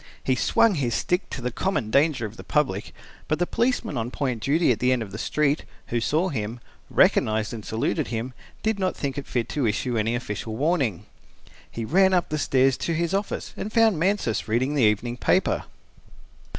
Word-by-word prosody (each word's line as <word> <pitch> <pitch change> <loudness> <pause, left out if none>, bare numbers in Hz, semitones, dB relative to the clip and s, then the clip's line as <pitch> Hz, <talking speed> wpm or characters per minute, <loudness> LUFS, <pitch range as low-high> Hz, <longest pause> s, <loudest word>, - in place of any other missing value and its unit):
He 130 - +2
swung 205 - +3
his 130 -8 -1
stick 180 +1 -1
to 130 - -6
the 125 - -1
common 150 - -1
danger 140 -3 +3
of 110 +1 -7
the - - -10
public, 135 -10 0 0.4
but 155 - +1
the 175 - +1
policeman 235 - 0
on 115 +1 -2
point 125 -4 -2
duty 150 +3 +3
at 115 - 0
the 125 +1 +2
end 125 -3 +1
of 100 - -10
the 105 - -6
street, 150 +3 +1 0.3
who 120 0 0
saw 160 +9 +1
him, 115 - -4 0.3
recognized 110 0 +3
and 110 -2 -6
saluted 110 +2 -1
him, 120 +2 -4 0.3
did 220 -2 0
not 185 -1 0
think 140 -1 -2
it 140 - -9
fit 120 -2 -1
to 140 -6 0
issue 115 +2 0
any 115 +2 0
official 110 -2 -4
warning. 140 - 0 0.6
He 115 - -5
ran 190 - +4
up 175 - +1
the 155 - -1
stairs 135 -2 +3
to 165 - -2
his 170 +2 -1
office, 200 +1 -2
and 215 - -5
found 225 -6 +4
Mansus 185 - 0
reading 125 +6 +1
the 145 - +1
evening 120 +3 +1
paper. - - +1
130 Hz, 200 wpm, -25 LUFS, 115-165 Hz, 0.6 s, ran